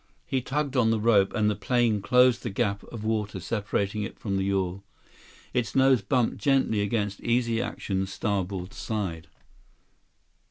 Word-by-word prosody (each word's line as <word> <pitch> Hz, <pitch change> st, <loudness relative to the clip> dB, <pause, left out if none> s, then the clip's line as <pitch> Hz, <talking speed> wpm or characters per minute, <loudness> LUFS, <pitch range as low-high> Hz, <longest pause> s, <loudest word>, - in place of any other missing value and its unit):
He 130 Hz, +7 st, -1 dB
tugged 140 Hz, +2 st, -2 dB
on 120 Hz, -3 st, +4 dB
the 115 Hz, -1 st, +2 dB
rope, 105 Hz, -3 st, +4 dB
and 110 Hz, -3 st, +2 dB
the 105 Hz, -, +1 dB
plane 115 Hz, -1 st, +1 dB
closed 125 Hz, +2 st, +4 dB
the 115 Hz, -, -3 dB
gap 100 Hz, -1 st, -1 dB
of 115 Hz, -3 st, -8 dB
water 110 Hz, -2 st, -1 dB
separating 105 Hz, -1 st, -2 dB
it 105 Hz, -, -5 dB
from 100 Hz, -3 st, -3 dB
the 95 Hz, 0 st, 0 dB
yawl. 95 Hz, -1 st, -1 dB, 0.7 s
Its 115 Hz, -5 st, -1 dB
nose 130 Hz, -3 st, +5 dB
bumped 125 Hz, +3 st, +1 dB
gently 135 Hz, -7 st, +2 dB
against 100 Hz, -1 st, -1 dB
Easy 115 Hz, -1 st, +1 dB
Action's 95 Hz, -1 st, -3 dB
starboard 95 Hz, -2 st, -2 dB
side. 95 Hz, -7 st, -4 dB
105 Hz, 155 wpm, -27 LUFS, 100-120 Hz, 0.7 s, nose